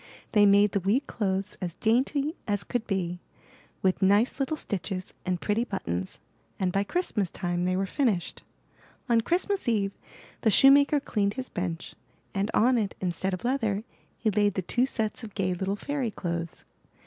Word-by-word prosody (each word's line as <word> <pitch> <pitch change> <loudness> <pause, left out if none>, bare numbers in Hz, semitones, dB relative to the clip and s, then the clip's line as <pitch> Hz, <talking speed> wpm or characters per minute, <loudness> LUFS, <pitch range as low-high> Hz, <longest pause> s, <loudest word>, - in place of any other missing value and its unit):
They 205 -2 +6
made 200 0 +5
the 200 - +1
wee 200 +8 +2
clothes 200 -5 -2
as 175 -3 -4
dainty 275 +7 +1
as 205 -1 0
could 240 -2 -3
be, 180 -3 -2 0.6
with 185 -1 +2
nice 205 +8 +3
little 275 +3 -1
stitches 190 - -4
and 180 -1 0
pretty 210 +5 0
buttons; 95 - -4 0.4
and 185 -1 +1
by 195 +2 +1
Christmas 210 - -1
time, 175 0 -2
they 185 0 +1
were 195 - +1
finished. 205 - -1 0.7
On 235 -2 +4
Christmas 370 - 0
eve, 205 -4 +1 0.5
the 225 - +3
shoemaker 280 +5 +6
cleaned 205 -6 -1
his 260 -1 -5
bench, 175 -2 -4 0.4
and 200 +1 0
on 245 +2 +4
it 205 -3 -2
instead 185 +1 -1
of 185 - -12
leather, 225 -5 0 0.3
he 220 - +1
laid 205 -1 +2
the 190 - -1
two 245 +8 +1
sets 220 -2 -2
of 210 -3 -9
gay 185 -2 0
little 190 +2 -2
fairy 275 +2 -2
clothes. 170 -5 -5
205 Hz, 170 wpm, -27 LUFS, 185-240 Hz, 0.7 s, They